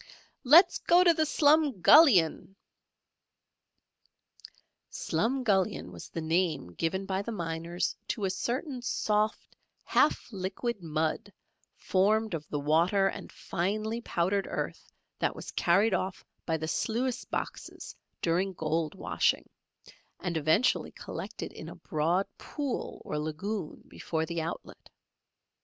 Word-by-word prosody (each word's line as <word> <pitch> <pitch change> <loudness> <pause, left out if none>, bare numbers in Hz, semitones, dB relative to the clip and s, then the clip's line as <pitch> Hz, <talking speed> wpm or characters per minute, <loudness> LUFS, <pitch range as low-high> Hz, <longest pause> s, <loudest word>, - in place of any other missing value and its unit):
"Let's 340 +7 +7
go 350 +1 +5
to 345 -2 +6
the 315 -1 +1
Slumgullion." 285 - +5 2.4
"Slumgullion" 220 - 0
was 85 -2 -10
the 165 - -5
name 160 - 0
given 190 - -2
by 190 0 -1
the 230 - -5
miners 170 -2 -3
to 210 - -2
a 190 - 0
certain 255 - -3
soft, 215 -2 -1 0.3
half - - +2
liquid 195 +4 -3
mud, 160 -1 -2 0.5
formed 215 +2 +1
of 155 -2 -5
the 145 - -2
water 170 +7 +3
and - - -8
finely 215 +6 -2
powdered 195 -1 0
earth - - -5 0.3
that - - 0
was - - -8
carried 195 +5 +3
off 185 0 -2 0.2
by 160 -1 +1
the 160 0 -4
sluice 240 +8 -1
boxes - - -6 0.3
during 180 +3 +1
gold 160 -1 -2
washing, - - 0 0.7
and 175 -2 -3
eventually 160 +10 +2
collected - - -7
in - - -8
a - - -9
broad 170 +4 0
pool 285 -4 -4
or 150 - -3
lagoon 160 +4 -4
before 160 -1 -3
the 170 0 -3
outlet. 165 +1 -7
190 Hz, 120 wpm, -29 LUFS, 165-225 Hz, 2.4 s, Let's